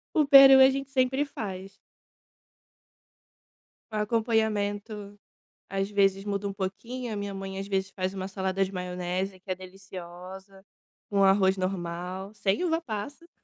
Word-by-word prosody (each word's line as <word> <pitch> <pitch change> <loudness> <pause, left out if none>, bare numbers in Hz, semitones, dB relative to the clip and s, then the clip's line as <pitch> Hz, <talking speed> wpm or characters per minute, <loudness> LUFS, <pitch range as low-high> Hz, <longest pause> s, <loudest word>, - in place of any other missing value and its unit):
O 305 - +4
peru 275 -1 +10
a 265 - +8
gente 275 0 -3
sempre 265 +1 +1
faz. 195 -7 -7 2.2
O 215 - -6
acompanhamento, 210 -2 -1 0.5
às 195 +1 -2
vezes, 195 -1 +2
muda 200 -1 -2
um 200 - -2
pouquinho, 225 +5 -5
a - - -3
minha 200 0 -4
mãe, 195 0 -6
às 195 +1 -5
vezes, 190 -1 -1
faz 185 0 -3
uma 190 -1 -4
salada 190 0 -1
de - - -7
maionese, 180 +1 -3
que 190 - -20
é 185 - 0
deliciosa, 185 0 -11 0.5
com 200 -1 +2
arroz 190 0 +4
normal, 185 +1 -4
sem 200 - 0
uva-passas. 320 0 -3
195 Hz, 140 wpm, -27 LUFS, 190-220 Hz, 2.2 s, peru